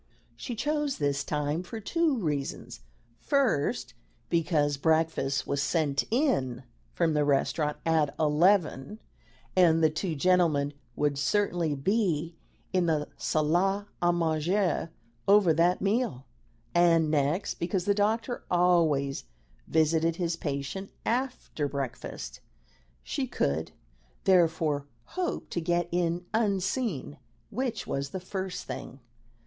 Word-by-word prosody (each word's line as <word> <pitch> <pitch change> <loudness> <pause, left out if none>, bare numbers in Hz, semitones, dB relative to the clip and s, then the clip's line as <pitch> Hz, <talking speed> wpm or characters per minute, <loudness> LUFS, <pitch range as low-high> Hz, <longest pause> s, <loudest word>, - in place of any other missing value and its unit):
She 245 - -5
chose 295 +3 -1
this 140 -1 0
time 150 +2 -1
for 200 +5 -7
two 315 +5 +1
reasons: 145 - -3 0.4
first, 265 - +1 0.4
because 155 -4 +2
breakfast 160 -3 +1
was 140 - -1
sent 145 -3 +1
in 210 - +1 0.3
from 165 -2 +1
the 150 -1 +2
restaurant 150 +1 +1
at 155 -3 +2
eleven, 160 +2 +2 0.6
and 165 -3 +5
the 155 - +5
two 160 +2 -2
gentlemen 155 -3 +2 0.2
would 145 -2 0
certainly 175 -2 +1
be 170 0 0 0.4
in 180 -2 +2
the 155 -2 0
salle 180 +6 +1 0.2
'a 175 0 +4
manger 170 +2 0 0.4
over 200 -4 +6
that 170 +3 +2
meal; 200 - 0 0.5
and, 165 -3 +4
next, 150 +5 0
because 175 +1 -1
the 205 - +3
doctor 220 +4 0
always 165 -6 +2 0.4
visited 160 +1 +2
his 170 -1 -1
patient 150 +5 -4 0.2
after 245 - -1
breakfast. 130 - -5 0.6
She - - -2
could, 70 - -1 0.5
therefore, 160 -6 +2 0.2
hope 365 -1 -3
to 170 - -1
get 175 +1 0
in 175 0 0
unseen, 200 - -1 0.3
which 240 -1 -2
was 140 0 -3
the 190 - -5
first 185 0 -5
thing. 135 - -7
165 Hz, 115 wpm, -28 LUFS, 150-195 Hz, 0.6 s, over